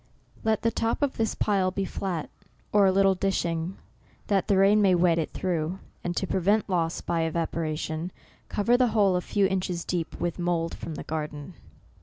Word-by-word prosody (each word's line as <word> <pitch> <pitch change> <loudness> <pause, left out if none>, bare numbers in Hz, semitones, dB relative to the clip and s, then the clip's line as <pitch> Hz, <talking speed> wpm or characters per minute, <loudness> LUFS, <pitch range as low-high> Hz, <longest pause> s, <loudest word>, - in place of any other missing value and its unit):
Let 220 -1 +1
the 230 - +3
top 230 +6 -1
of 280 - 0
this 225 -1 0
pile 195 -3 +2
be 195 +1 -2
flat, 180 -4 -4 0.4
or 205 -2 +6
a - - +5
little 195 +1 +4
eCTOBER. 185 - -4
J 195 - +2
89 - - +4 0.4
dishing, 190 - -11 0.5
that 195 -2 +1
the 200 - +3
rain 200 +2 +5
may 190 -3 +5
wet 170 -1 +3
it 160 - -1
through, 175 -1 -2 0.3
and 175 0 -2
to - - +1
prevent 195 +4 +1
loss 170 -3 0
by 170 -1 -1
evaporation, 160 0 -2 0.4
cover 230 +4 +2
the 250 0 +4
whole 195 -3 +4
a 180 - +1
few 200 +2 +1
inches 185 -2 -1
deep 170 -2 -3
with 175 0 -2
mould 170 -1 0
from 160 - -6
the - - -6
garden. 150 +1 -5
185 Hz, 200 wpm, -27 LUFS, 165-200 Hz, 0.5 s, or